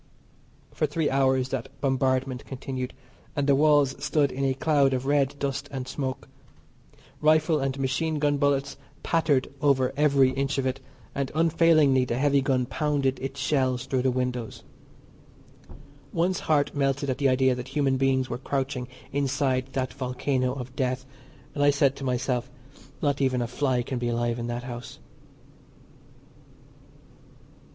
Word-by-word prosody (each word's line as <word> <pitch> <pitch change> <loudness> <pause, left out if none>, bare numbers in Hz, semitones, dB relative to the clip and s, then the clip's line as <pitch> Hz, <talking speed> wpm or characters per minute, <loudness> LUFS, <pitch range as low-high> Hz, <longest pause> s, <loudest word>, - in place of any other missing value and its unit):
For 155 - 0
three 150 +1 -1
hours 130 -1 +2
that 135 -1 -3
bombardment 130 -1 0
continued, 130 -1 -5 0.4
and 145 -2 0
the 140 - +4
walls 145 -1 +4
stood 150 -2 +2
in 135 - -3
a 135 -1 +1
cloud 140 -2 +2
of 130 +1 -3
red 140 -1 +2
dust 140 0 -3
and 130 -2 -5
smoke. 130 -1 -4 0.9
Rifle 155 +1 +3
and 135 0 -2
machine 145 +4 -1
gun 145 -1 +1
bullets 140 -1 0 0.3
pattered 145 -5 +1
over 130 -3 +2
every 140 -3 +4
inch 135 +1 -1
of 135 - 0
it, 130 +1 -1 0.3
and, 140 -1 -2
unfailingly 160 -5 +4
the 120 -1 -2
heavy 140 +1 +3
gun 130 -2 +1
pounded 140 -1 0
its 135 +1 -5
shells 130 -3 0
through 130 -1 0
the 130 - +2
windows. 125 -2 -3 1.5
One's 175 +2 0
heart 145 -2 +2
melted 140 -1 0
at 130 - -4
the 140 -2 +3
idea 130 0 +3
that 125 0 -6
human 135 -1 +1
beings 130 -1 +1
were 120 - -4
crouching 135 -2 -2 0.2
inside 135 -2 0
that 130 -2 -2
volcano 130 0 -1
of 130 -1 -7
death, 130 0 -1 0.5
and 145 - 0
I 145 - +6
said 140 -1 +3
to - - -7
myself, 125 -1 -1 0.5
"Not 145 -1 +1
even 130 -2 +2
a 120 - -1
fly 125 0 0
can 130 0 -4
be 120 - -2
alive 120 0 -1
in 120 - -3
that 120 0 -4
house." 120 -1 -8
135 Hz, 155 wpm, -26 LUFS, 130-145 Hz, 1.5 s, I